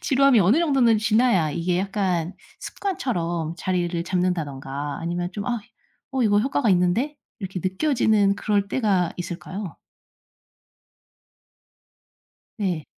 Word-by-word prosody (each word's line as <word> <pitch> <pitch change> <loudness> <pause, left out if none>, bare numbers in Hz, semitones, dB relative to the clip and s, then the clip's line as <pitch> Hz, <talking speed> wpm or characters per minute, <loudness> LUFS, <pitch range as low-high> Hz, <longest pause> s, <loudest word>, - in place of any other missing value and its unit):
지루함이 270 -4 +4
어느 205 - +4
정도는 265 -9 +3
지나야 215 -6 +3
이게 175 +3 -1
약간 190 -3 -1 0.3
습관처럼 175 - -3
자리를 175 -2 -1
잡는다든가 145 -6 -2
아니면 175 +1 -3
좀 205 -1 -5
'아 240 -2 -1 0.5
어 260 -2 +1
이거 205 -2 +4
효과가 265 -1 0
있는데?' 190 +11 +1 0.2
이렇게 190 -3 -5
느껴지는 210 -1 +2
그럴 205 -1 0
때가 195 -9 +1
있을까요? 180 +2 -6 2.8
네. 180 -7 -2
190 Hz, 270 characters per minute, -24 LUFS, 175-230 Hz, 2.8 s, 지루함이